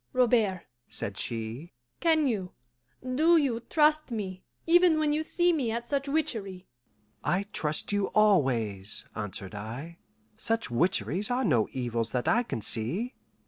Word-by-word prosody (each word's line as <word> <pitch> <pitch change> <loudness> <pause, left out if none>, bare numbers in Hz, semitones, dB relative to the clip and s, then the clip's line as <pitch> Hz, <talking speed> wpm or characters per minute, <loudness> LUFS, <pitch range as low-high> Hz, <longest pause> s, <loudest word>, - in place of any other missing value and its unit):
"Robert," 225 -7 +2 0.2
said 100 - -2
she, 115 +7 -3 0.3
"can 320 -3 +3
you, 195 -7 -2 0.5
do 305 +7 +3
you 265 -7 +1
trust 305 +5 +2
me, 190 -5 -4 0.2
even 345 -1 +5
when 305 -1 +1
you 305 - +1
see 345 +2 +2
me 270 -8 0
at 235 +1 -3
such 280 -1 -1
witchery?" 205 -11 -2 0.6
"I 190 +3 +1
trust 150 +4 0
you 205 -1 +1
always," 120 - +1
answered 100 -2 -5
I. 120 +11 -7 0.4
"Such 225 - 0
witcheries 175 - +1
are 250 +1 0
no 120 - +2
evils 120 -3 -2
that 125 -1 -1
I 235 - +4
can 230 - -4
see." 175 - -1
205 Hz, 145 wpm, -28 LUFS, -, 0.6 s, even